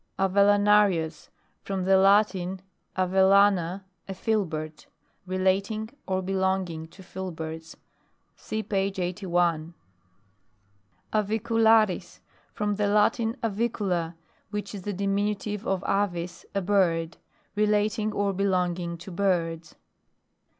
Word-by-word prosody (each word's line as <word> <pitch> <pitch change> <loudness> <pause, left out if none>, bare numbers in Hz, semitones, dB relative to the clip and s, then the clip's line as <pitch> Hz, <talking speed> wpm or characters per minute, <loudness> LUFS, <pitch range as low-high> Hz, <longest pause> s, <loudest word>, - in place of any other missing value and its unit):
AVELLANARIUS. 200 -4 +3 0.3
From 195 -2 -3
the 190 0 +5
Latin, 190 -1 +3 0.3
av 185 -1 +1
ellana, 190 -1 +4 0.2
a 195 - -5
filbert. 160 -8 -2 0.4
Relating 195 +4 0 0.2
or 190 0 -1
be 190 +1 -3
longing 190 -4 -1
to 190 +3 -15
filberts. 165 -4 -7 0.6
(See 220 0 -4
page 195 -1 -1
81.) 175 -3 -1 1.4
AVICULARIS. 220 -2 +2 0.3
From 205 -1 -2
the 210 -1 +1
Latin 220 +3 +2
avicula, 200 -6 -1 0.3
which 210 +1 -5
is 200 - -6
the 205 +2 -4
diminutive 205 +2 -2
of 195 -1 0
avis, 180 -3 -2
a 195 - 0
bird. 170 -4 +1 0.4
Relating 210 +1 +1
or 200 -1 0
belonging 180 -3 -1
to 175 +3 -10
birds. 170 -4 -1
195 Hz, 100 wpm, -26 LUFS, 180-205 Hz, 1.4 s, the